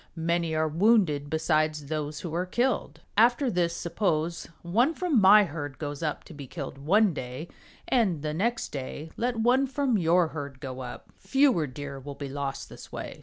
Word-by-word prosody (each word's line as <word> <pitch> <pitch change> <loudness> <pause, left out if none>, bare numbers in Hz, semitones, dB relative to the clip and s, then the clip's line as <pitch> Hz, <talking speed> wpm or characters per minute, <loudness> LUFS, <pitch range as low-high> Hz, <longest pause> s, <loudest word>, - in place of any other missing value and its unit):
Many 165 0 0
are 155 0 +2
wounded 165 -4 +3
besides 155 -1 +1
those 150 0 -3
who 170 -3 -5
are 180 +2 -1
killed. 240 +6 -1
After 240 +4 +4
this 170 -3 0
suppose 170 -2 -1 0.2
one 235 - +2
from 335 - +2
my 205 +2 +8
herd 145 -6 -5
goes 145 -1 -5
up 155 -2 -2
to - - -12
be 140 -3 -9
killed 140 -2 -7
one 195 +7 +3
day, 130 +5 -6 0.4
and 190 - +1
the 150 -1 -2
next 230 +8 -1
day 145 +3 -6
let 245 +1 -1
one 250 +4 +3
from 270 -5 +1
your 170 0 +3
herd 140 -4 -7
go 130 -2 -6
up. 125 -1 -8
Fewer 265 - +3
Deer 140 +1 -7
will 140 +1 -8
be 140 -1 -6
lost 140 0 -4
this - - -12
way." - - -7
165 Hz, 180 wpm, -27 LUFS, 145-215 Hz, 0.4 s, my